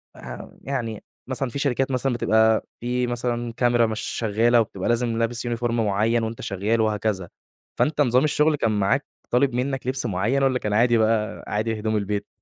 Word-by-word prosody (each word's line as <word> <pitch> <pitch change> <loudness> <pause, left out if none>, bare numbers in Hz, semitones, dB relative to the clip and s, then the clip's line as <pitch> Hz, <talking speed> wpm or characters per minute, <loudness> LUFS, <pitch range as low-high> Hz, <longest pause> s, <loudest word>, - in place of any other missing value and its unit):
آآ - - -13 0.2
ه - - -19
يعني 120 -6 -3 0.3
مثلًا 130 0 -2
في 140 - -5
شركات 135 -1 0
مثلًا 130 0 0
بتبقى 110 -1 +3
في 125 +1 -1
مثلًا 120 -1 -2
كاميرا 120 0 +3
مش 110 -1 -3
شَغَّالة، 115 +2 +2
وبتبقى 100 -3 -3
لازم 120 -1 +1
لابس 115 +1 -1
Uniform 120 0 -1
مُعيَّن 115 +1 +1
وأنت 110 +1 -4
شَغَّال 105 +4 0
وهكذا، 105 -4 -1 0.5
فأنت 150 -1 +2
نظام 125 -2 +3
الشُّغل 155 0 +3
كان 115 -6 0
معاك 105 +9 +1 0.3
طالب 130 +1 +3
منك 130 0 -2
لِبس 130 -1 -1
مُعيَّن، 115 +7 0
والّا 130 -1 +2
كان 105 -3 -2
عادي 120 +2 +4
بقى 110 -1 0
عادي 110 +1 -1
هدوم 110 +1 -1
البيت؟ 105 0 -2
115 Hz, 180 wpm, -24 LUFS, 110-125 Hz, 0.5 s, عادي